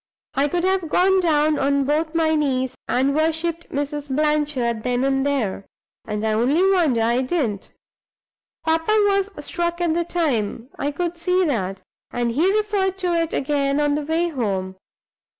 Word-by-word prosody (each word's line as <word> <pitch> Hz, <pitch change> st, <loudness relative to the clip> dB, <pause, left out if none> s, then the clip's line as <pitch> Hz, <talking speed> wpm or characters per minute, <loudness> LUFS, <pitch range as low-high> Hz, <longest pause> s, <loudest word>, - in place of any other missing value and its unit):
I 275 Hz, +2 st, +2 dB
could 345 Hz, +4 st, -1 dB
have 375 Hz, -3 st, +1 dB
gone 380 Hz, +3 st, +3 dB
down 305 Hz, -3 st, +2 dB
on 280 Hz, 0 st, +2 dB
both 310 Hz, +3 st, -1 dB
my 320 Hz, -1 st, +2 dB
knees 260 Hz, -4 st, 0 dB
and 265 Hz, +3 st, +1 dB
worshipped 320 Hz, +2 st, -1 dB
Mrs. 290 Hz, 0 st, -3 dB
Blanchard 290 Hz, -5 st, 0 dB
then 250 Hz, +1 st, 0 dB
and 270 Hz, 0 st, +1 dB
there; 245 Hz, -9 st, -1 dB, 0.4 s
and 210 Hz, 0 st, -3 dB
I 220 Hz, -, +1 dB
only 260 Hz, +11 st, +2 dB
wonder 305 Hz, -12 st, +2 dB
I 235 Hz, +3 st, +2 dB
didn't! 255 Hz, -, -2 dB, 1.0 s
Papa 325 Hz, +6 st, +2 dB
was 395 Hz, 0 st, +1 dB, 0.2 s
struck 345 Hz, 0 st, -2 dB
at 345 Hz, -2 st, +1 dB
the 340 Hz, +1 st, +1 dB
time 255 Hz, -9 st, -1 dB
I 285 Hz, -, 0 dB
could 340 Hz, +3 st, -3 dB
see 360 Hz, +2 st, +2 dB
that 195 Hz, -, -2 dB, 0.3 s
and 240 Hz, -1 st, -1 dB
he 325 Hz, +11 st, +2 dB
referred 405 Hz, -2 st, 0 dB
to 360 Hz, -2 st, 0 dB
it 330 Hz, -1 st, 0 dB
again 280 Hz, 0 st, 0 dB
on 295 Hz, -1 st, +2 dB
the 300 Hz, -, 0 dB
way 325 Hz, +4 st, 0 dB
home. 195 Hz, -, -2 dB
295 Hz, 165 wpm, -22 LUFS, 255-340 Hz, 1.0 s, gone